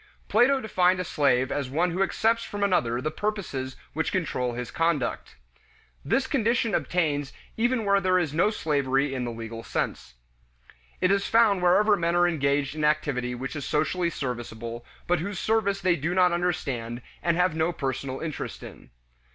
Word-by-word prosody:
Plato 245 Hz, +6 st, +4 dB
defined 185 Hz, -5 st, +2 dB
a -, -, 0 dB
slave 130 Hz, -5 st, +1 dB
as 140 Hz, -3 st, -2 dB
one 170 Hz, +6 st, +1 dB
who 180 Hz, +3 st, -2 dB
accepts 225 Hz, +4 st, +1 dB
from 205 Hz, 0 st, -4 dB
another 125 Hz, -12 st, +1 dB
the 155 Hz, -, -2 dB
purposes 155 Hz, -10 st, -3 dB, 0.2 s
which 160 Hz, +1 st, -1 dB
control 125 Hz, -9 st, -1 dB
his 125 Hz, 0 st, -5 dB
conduct. 165 Hz, -7 st, -1 dB, 0.7 s
This 265 Hz, -, +1 dB
condition 235 Hz, -4 st, +1 dB
obtains 145 Hz, -5 st, 0 dB, 0.2 s
even 240 Hz, 0 st, +1 dB
where 200 Hz, 0 st, +3 dB
there 185 Hz, 0 st, +3 dB
is 160 Hz, -5 st, 0 dB
no 170 Hz, +6 st, +3 dB
slavery 140 Hz, -7 st, 0 dB
in 130 Hz, -2 st, -2 dB
the 120 Hz, -, -3 dB
legal 115 Hz, 0 st, -7 dB
sense. -, -, -4 dB, 0.9 s
It 185 Hz, -, +3 dB
is 200 Hz, 0 st, +1 dB
found 225 Hz, -5 st, +4 dB
wherever 205 Hz, +4 st, +4 dB
men 170 Hz, -2 st, 0 dB
are 175 Hz, 0 st, +4 dB
engaged 140 Hz, -3 st, 0 dB
in 155 Hz, 0 st, -4 dB
activity 145 Hz, -5 st, 0 dB
which 130 Hz, +5 st, -5 dB
is 145 Hz, -, -4 dB
socially 170 Hz, +5 st, 0 dB
serviceable, 120 Hz, -4 st, -5 dB, 0.2 s
but 175 Hz, -1 st, +1 dB
whose 195 Hz, +4 st, -4 dB
service 200 Hz, -1 st, +1 dB
they 180 Hz, -2 st, +3 dB
do 165 Hz, +3 st, -2 dB
not 180 Hz, -1 st, +5 dB
understand 130 Hz, -9 st, -2 dB, 0.2 s
and 170 Hz, -1 st, +1 dB
have 180 Hz, -1 st, +2 dB
no 160 Hz, +2 st, +1 dB
personal 135 Hz, -3 st, -4 dB
interest 160 Hz, -3 st, -5 dB
in. -, -, -12 dB
165 Hz, 170 wpm, -26 LUFS, 135-190 Hz, 0.9 s, not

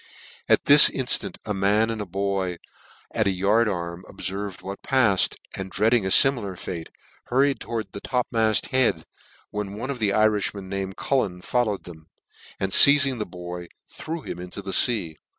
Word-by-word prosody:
At -, -, +3 dB
this 145 Hz, +2 st, +9 dB
in 130 Hz, -, -4 dB
ftant -, -, -1 dB
a 105 Hz, -, -2 dB
man 105 Hz, +3 st, +1 dB
and 110 Hz, -1 st, -5 dB
a 105 Hz, -, -6 dB
boy 95 Hz, -1 st, -2 dB, 0.5 s
at 110 Hz, -, 0 dB
the 100 Hz, -, +2 dB
yard 100 Hz, +5 st, +1 dB
arm 85 Hz, -2 st, -5 dB
ob -, -, -16 dB
fcrved 100 Hz, 0 st, -5 dB
what 100 Hz, +1 st, -7 dB
pail, 130 Hz, -7 st, +2 dB, 0.4 s
and 95 Hz, 0 st, -6 dB
dreading 110 Hz, +1 st, +1 dB
a -, -, -1 dB
limilar 105 Hz, -5 st, +4 dB
fate, 85 Hz, -2 st, -7 dB, 0.4 s
hurried 135 Hz, +2 st, +1 dB
toward 110 Hz, -4 st, -5 dB
the 100 Hz, -, -9 dB
topmaft 115 Hz, -4 st, 0 dB
head, 125 Hz, -11 st, +1 dB, 0.5 s
when 105 Hz, -1 st, -5 dB
one 130 Hz, +5 st, -4 dB
of 130 Hz, -, -6 dB
tne 105 Hz, -3 st, +1 dB
Irifhmcn, 105 Hz, -2 st, 0 dB
named 95 Hz, 0 st, -5 dB
Cullen, 100 Hz, -10 st, -2 dB
followed 110 Hz, -5 st, -1 dB
them, 80 Hz, -2 st, -13 dB, 0.5 s
and 95 Hz, 0 st, -2 dB
feizing 140 Hz, +1 st, +6 dB
the 105 Hz, -, -4 dB
boy, 90 Hz, 0 st, -8 dB, 0.2 s
threw 165 Hz, +1 st, -7 dB
him -, -, -7 dB
into 90 Hz, +3 st, -8 dB
the 95 Hz, -1 st, -5 dB
fea. 90 Hz, -, +1 dB
100 Hz, 175 wpm, -24 LUFS, 95-115 Hz, 0.5 s, this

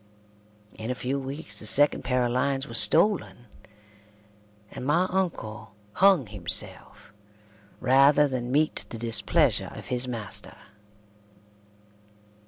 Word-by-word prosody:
In 110 Hz, +2 st, -6 dB
a 125 Hz, -, -2 dB
few 130 Hz, +2 st, -3 dB
weeks 135 Hz, -6 st, -4 dB
the 110 Hz, -, -2 dB
second 145 Hz, +6 st, +3 dB
pair 125 Hz, 0 st, 0 dB
of 120 Hz, -, -2 dB
lines 135 Hz, +2 st, -1 dB
was 115 Hz, -1 st, +3 dB
stolen, 170 Hz, -, +3 dB, 1.3 s
and -, -, -8 dB
my 155 Hz, +7 st, +2 dB
uncle 110 Hz, -, -4 dB, 0.2 s
hung 190 Hz, -, +4 dB
himself 105 Hz, +1 st, -7 dB, 0.7 s
rather 140 Hz, +3 st, +4 dB
than 125 Hz, -2 st, -4 dB
meet 155 Hz, +3 st, 0 dB
the 115 Hz, -, -7 dB
displeasure 115 Hz, -2 st, +1 dB
of -, -, -10 dB
his 125 Hz, +1 st, -1 dB
master. 115 Hz, -5 st, -6 dB
125 Hz, 115 wpm, -26 LUFS, 115-145 Hz, 1.3 s, hung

